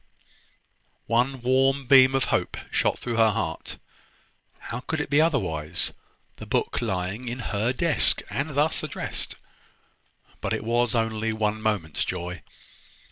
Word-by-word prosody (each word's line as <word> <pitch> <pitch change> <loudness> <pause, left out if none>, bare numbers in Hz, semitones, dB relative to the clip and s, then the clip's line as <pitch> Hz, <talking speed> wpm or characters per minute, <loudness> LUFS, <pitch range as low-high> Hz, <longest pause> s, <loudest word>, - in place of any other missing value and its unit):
One 125 +3 +1
warm 135 +2 +2
beam 130 0 +7
of 135 - +2
hope - - 0
shot - - +1
through 120 -2 -3
her 115 -1 +6
heart: 100 -7 -3 0.8
how 115 - -6
could 160 +5 -3
it 145 - -3
be 145 +2 +5
otherwise, 90 - 0 0.4
the - - -9
book - - 0
lying 100 +2 -2
in 120 +1 -3 0.2
her 105 +4 +1
desk, 155 +4 +2
and 140 +9 -2
thus 150 +2 +2
addressed? - - -4 1.1
But - - -1
it - - -2
was 120 +1 +1
only 110 -1 0
one 110 0 -1
moment's 100 -8 -1
joy. 90 -1 -4
115 Hz, 135 wpm, -26 LUFS, 105-135 Hz, 1.1 s, beam